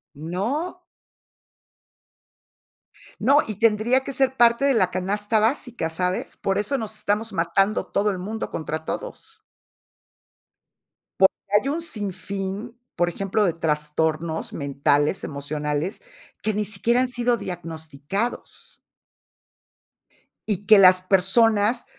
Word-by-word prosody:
No. 225 - -3 2.4
No, 275 +7 +5
y 215 - -5
tendría 230 +5 +2
que 275 - -4
ser 265 0 +1
parte 235 +2 +4
de 280 -1 +4
la 185 -6 +2
canasta 205 +4 0
básica, 230 - 0
¿sabes? 180 +3 -2
Por 195 0 -1
eso 210 +7 0
nos 220 -3 -5
estamos 215 +1 -1
matando 195 +4 +1
todo 210 +1 0
el 190 - -4
mundo 215 +5 -5
contra 160 0 -4
todos. - - -7 1.8
Porque 190 - +6 0.3
hay - - -5
un 320 +4 -2
sinfín, 200 - -4 0.2
por 175 0 +1
ejemplo, 195 +4 -1
de 180 - +2
trastornos 160 0 -1
mentales, 145 +3 0
emocionales, 150 - -3 0.4
que 215 - 0
ni 210 +1 0
siquiera 235 +4 +1
han 255 - 0
sido 245 -1 +1
diagnosticados. 165 - -5 1.7
Y 205 -2 -2
que 215 0 +7
las 185 -1 +7
personas 205 +4 +3
200 Hz, 115 wpm, -23 LUFS, 170-230 Hz, 2.4 s, que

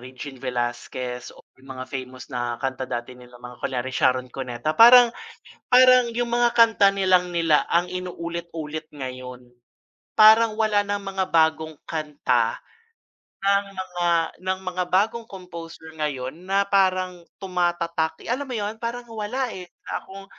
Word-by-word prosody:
Regine 130 +1 -10
Velasquez 125 0 -4
o - - -17 0.2
yung 130 0 -10
mga 130 - -5
famous 130 0 -8
na 120 -1 -2
kanta 130 0 -4
dati 120 +1 -4
nila 125 -1 -15
mga 125 0 -12
kunyari 130 0 -3
Sharon 130 0 +1
Cuneta. 130 +2 -3
Parang 240 +4 +8 0.6
parang 250 -1 +6
yung 240 +1 -1
mga 240 0 +3
kanta 225 -4 +5
nalang 185 -2 +2
nila 165 -3 +3
ang 175 +1 +2
inulit-ulit 170 -3 -6
ngayon. 130 -3 -8 0.7
Parang 220 +1 +7
wala 210 -2 +1
nang 205 0 -2
mga 195 -1 -2
bagong 160 -1 +1
kanta 155 - -1 0.8
ng 200 0 +3
mga 180 -2 -3 0.3
ng 185 +1 -2
mga 185 0 -2
bagong 225 +5 0
composer 170 -4 -10
ngayon 135 -4 -2 0.2
na 195 +1 +2
parang 185 -3 0 0.2
tumatatak. 175 -3 -1
Eh, - - -4
alam 280 +3 -2
mo 255 - -4
yun 210 0 -3
parang 235 +1 -4
wala, 225 +4 -3
eh, 180 -3 -8 0.2
na - - -4
akong 195 +1 -12
175 Hz, 145 wpm, -24 LUFS, 130-205 Hz, 0.8 s, Parang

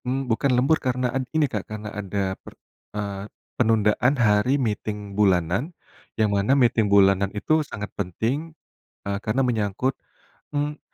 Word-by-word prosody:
Mmm, 135 +2 -1
bukan 125 +3 +1
lembur 140 +6 +3
karena 125 -1 -1
en 130 -1 -2
ini 155 -1 +2
Kak, 105 -7 -5
karena 105 -1 -6
ada 100 -1 -2
per - - -14 0.4
eee, 100 0 -4 0.2
penundaan 115 +2 +2
hari 115 +3 +3
meeting 105 -4 -3
bulanan, 95 - +2 0.5
yang 110 -2 +2
mana 100 +8 +2
meeting 115 -5 +3
bulanan 100 -1 +4
itu 155 +9 +2
sangat 105 -8 -7
penting, 125 - -3 0.5
eee, 100 0 -1
karena 110 +4 0
menyangkut, 120 0 0 0.6
mmm, 145 +1 -1
110 Hz, 145 wpm, -24 LUFS, 100-130 Hz, 0.6 s, bulanan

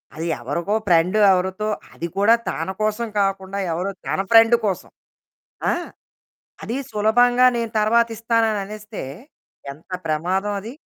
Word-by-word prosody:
అది 165 +2 -4
ఎవరికో 170 - -2
ఫ్రెండ్. 175 +4 +3
ఎవరితో 190 +3 0 0.3
అది 170 - -5
కూడా 205 +3 +5 0.2
తన 165 +3 -3
కోసం 215 +2 0
కాకుండా 195 0 -1
ఎవరో 185 +4 -2 0.2
తన - - -1
ఫ్రెండ్ 225 +1 +7
కోసం. 190 -3 -2 0.8
ఆ! - - +3 0.9
అది 235 - -4 0.2
సులభంగా 245 +4 +4
నేను 230 -1 -2
తర్వాత 230 +2 +3
ఇస్తానని 225 -2 +1
అనేస్తే 210 +1 -8 0.7
ఎంత 155 +6 -19 0.2
ప్రమాదం 185 +6 -1
అది. 225 +4 -8
205 Hz, 125 wpm, -21 LUFS, 185-225 Hz, 0.9 s, ఫ్రెండ్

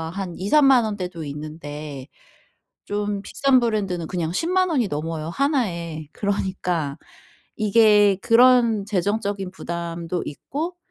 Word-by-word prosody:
한 190 -3 -4
2-3 210 +11 +3
만 260 -4 +5
원대도 185 -6 -4
있는데 150 -1 -7 0.8
좀 205 -1 -2
비싼 270 +4 +2
브랜드는 200 -7 -1
그냥 170 -3 -2
100,000 365 - +1
원이 255 -9 +1
넘어요 160 0 -4
1 275 - +1
에. 165 -2 -6
그러니까 180 -7 -2 0.6
이게 210 -2 +5
그런 235 -3 +5
재정적인 200 0 -1
부담도 170 -1 -4
있고 305 - -5
195 Hz, 220 characters per minute, -23 LUFS, 165-230 Hz, 0.8 s, 만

